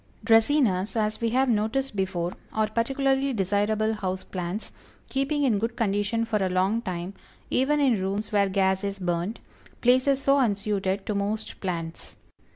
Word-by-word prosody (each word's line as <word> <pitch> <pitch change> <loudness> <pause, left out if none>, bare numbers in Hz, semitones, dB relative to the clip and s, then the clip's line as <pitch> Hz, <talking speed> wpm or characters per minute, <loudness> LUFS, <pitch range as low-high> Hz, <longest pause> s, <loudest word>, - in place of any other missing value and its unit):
Dracænas, 225 -4 +3
as 215 0 -1
we 230 - +1
have 260 +3 +2
noticed 235 +3 0
before, 185 -2 -1 0.2
are 220 0 +1
particularly 270 +4 0
desirable 210 +2 +1
house 190 -3 -3
plants, 180 +3 -5 0.4
keeping 280 +2 0
in 230 -7 +2
good 230 +2 -2
condition 205 +1 0
for 215 -2 -1
a 190 - +1
long 190 +5 +1
time, 185 -2 -4 0.4
even 285 +4 +2
in 250 -8 +3
rooms 200 +3 -2
where 200 -2 +3
gas 190 0 +1
is 200 0 -2
burned 180 +3 -2 0.4
places 260 +2 +4
so 275 0 +3
unsuited 200 -4 0
to 210 - -1
most 205 +2 -3
plants. 170 -3 -5
210 Hz, 155 wpm, -26 LUFS, 190-240 Hz, 0.4 s, places